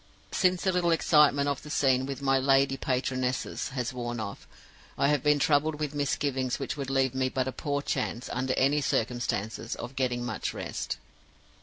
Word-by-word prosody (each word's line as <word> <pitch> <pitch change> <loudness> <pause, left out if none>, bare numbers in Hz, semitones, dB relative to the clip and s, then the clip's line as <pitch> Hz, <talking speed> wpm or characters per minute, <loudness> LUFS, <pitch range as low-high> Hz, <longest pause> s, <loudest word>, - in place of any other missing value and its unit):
Since 185 -2 +2
the 190 - +3
little 180 -1 +1
excitement 150 -3 +4
of 140 -2 -1
the 150 - -10
scene 130 -3 +2
with 140 0 -5
my 135 -1 +3
'lady 135 0 +3
patronesses' 130 -1 -1
has 125 -1 -3
worn 120 -1 -4
off, 100 -2 -6 0.5
I 140 - +3
have 150 -1 +2
been 150 0 +4
troubled 150 +1 +2
with 150 -1 -2
misgivings 140 -3 -1
which 135 - -3
would 140 -2 -4
leave 135 -2 +2
me 130 0 0
but 130 0 -1
a - - -1
poor 145 +1 -2
chance, 120 - -2
under 130 +1 0
any 145 +3 +3
circumstances, 115 -3 -1
of 120 +2 -7
getting 125 -2 -1
much 120 -3 -3
rest. - - -4
135 Hz, 180 wpm, -28 LUFS, 125-145 Hz, 0.5 s, excitement